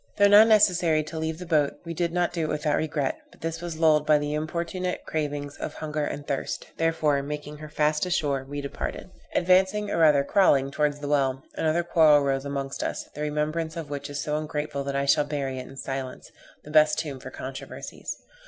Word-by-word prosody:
Though 205 -1 +6
now 205 +1 +9
necessary 180 -8 +4
to 160 +1 -6
leave 160 0 -2
the 180 - -7
boat, 155 -4 +2
we 165 - -4
did 170 0 -1
not 175 0 0
do 165 -3 -1
it - - -3
without 150 0 0
regret; 150 -3 -1
but - - -22
this 165 0 -3
was 170 -2 -5
lulled 155 -2 +4
by 150 0 +4
the 145 0 -2
importunate 170 +4 -3
cravings 145 -2 -3
of - - -5
hunger 155 -1 -3
and 145 0 -5
thirst; 140 - -3
therefore, 160 -3 +1
making 150 +1 -6
her 155 0 -9
fast 150 +3 +1
ashore, 145 -6 0
we 145 +2 -5
departed. 140 +5 -5 0.2
Advancing, 190 +3 +3
or - - 0
rather 150 -3 +5
crawling 140 -5 +3
towards 145 0 0
the 145 - -4
well, 135 -2 +1
another 160 +2 +1
quarrel 155 -4 +5
rose 135 0 0
amongst 140 -1 -4
us, - - -3
the 150 - -7
remembrance 155 +2 -2
of 155 -3 -6
which 145 0 -5
is 145 0 -4
so 150 0 -1
ungrateful 150 -2 -3
that 140 0 -3
I 140 0 +1
shall 140 - +4
bury 140 -3 -3
it 130 - -7
in 135 - -12
silence, 135 -1 -5 0.3
the 150 - -11
best 155 0 +5
tomb 145 -4 -3
for 130 - -8
controversies. 130 0 -7
150 Hz, 210 wpm, -26 LUFS, 145-165 Hz, 0.3 s, now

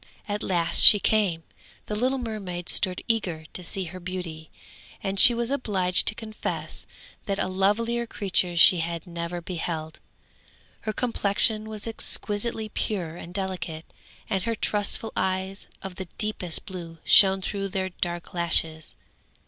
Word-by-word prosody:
At 205 0 -3
last 170 -3 +3
she 205 - +10
came. 195 -7 +1 0.4
The - - -5
little 255 +5 0
mermaid 195 -7 -6
stood 185 -1 +1
eager 180 -9 -1
to 180 - -5
see 190 +2 -1
her 185 +1 -8
beauty, 175 -3 -7 0.5
and 195 0 0
she 240 - +11
was 235 +2 -2
obliged 190 -9 +1
to 215 - +4
confess 215 -1 -6 0.4
that 200 -1 -1
a 200 - -1
lovelier 225 +5 0
creature 185 -5 -1
she 175 +1 +7
had 165 0 -4
never 170 0 -5
beheld. 165 -2 -5 0.8
Her 215 - -4
complexion 215 -1 0
was 215 -2 -5
exquisitely 220 0 -2
pure 180 -7 -3
and 175 0 -10
delicate, 180 -4 -5 0.4
and 195 -3 -1
her 230 +4 -2
trustful 210 +1 -1
eyes 190 +1 -2 0.2
of 190 -2 -8
the 190 - -5
deepest 210 -6 -2
blue 175 -5 -8
shone 195 -1 +7
through 195 0 -3
their 190 -1 -3
dark 175 -1 -5
lashes. 165 -2 +1
190 Hz, 145 wpm, -25 LUFS, 175-215 Hz, 0.8 s, she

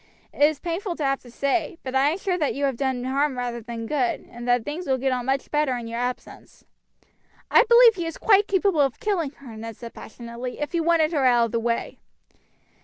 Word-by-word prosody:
It - - -9
is 300 0 +5
painful 345 +3 -3
to 310 - -4
have 275 0 +1
to 245 - -16
say, 290 +7 -1
but 260 - -5
I 270 +2 +4
am 325 - -1
sure 385 -2 -1
that 310 -5 -1
you 280 +1 0
have 270 -2 0
done 260 -1 -2
harm 270 +1 0
rather 240 -1 -3
than 230 0 -6
good, 255 -1 -1
and 240 +1 -8
that 245 -2 +2
things 320 +5 -5
will 265 -1 +2
get 265 +1 0
on 250 -1 -2
much 270 0 -1
better 295 -4 +1
in 240 - -6
your 230 +1 -4
absence." 250 0 -6 0.9
"I - - +7
believe 470 -1 +8
he 345 -5 -4
is 330 - -6
quite 410 -1 +4
capable 385 -4 +2
of 270 -3 0
killing 370 -8 -1
her," 255 -6 -12
Ned 225 0 -8
said 235 -1 -9
passionately, 235 +2 -8
"if 295 -2 -3
he 340 - 0
wanted 325 -1 +3
her 280 -4 +1
out 240 -2 +4
of 230 - -6
the 230 - 0
way." 235 0 -2
270 Hz, 235 wpm, -24 LUFS, 245-325 Hz, 0.9 s, believe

